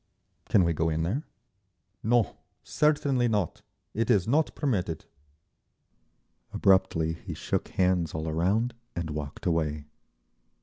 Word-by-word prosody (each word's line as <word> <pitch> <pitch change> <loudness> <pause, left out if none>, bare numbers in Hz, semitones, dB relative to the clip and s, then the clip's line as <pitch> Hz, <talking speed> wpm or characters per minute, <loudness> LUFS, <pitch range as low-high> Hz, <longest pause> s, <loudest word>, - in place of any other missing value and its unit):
"Can 100 - +5
we 85 -1 +2
go 80 +1 +1
in 80 0 0
there?" 105 - -1 0.8
"No. 115 -1 +2 0.3
Certainly 145 -5 +2
not. 105 -7 -1 0.3
It 115 +2 -1
is 100 -6 +3
not 150 +6 +2
permitted." 90 - -1 1.5
Abruptly 95 -4 +3
he 85 - -7
shook - - -2
hands 90 -4 +1
all 80 +1 -3
around 95 +10 +1 0.2
and 85 -2 -3
walked 75 -2 -6
away. 75 -3 0
90 Hz, 120 wpm, -28 LUFS, 80-115 Hz, 1.5 s, Can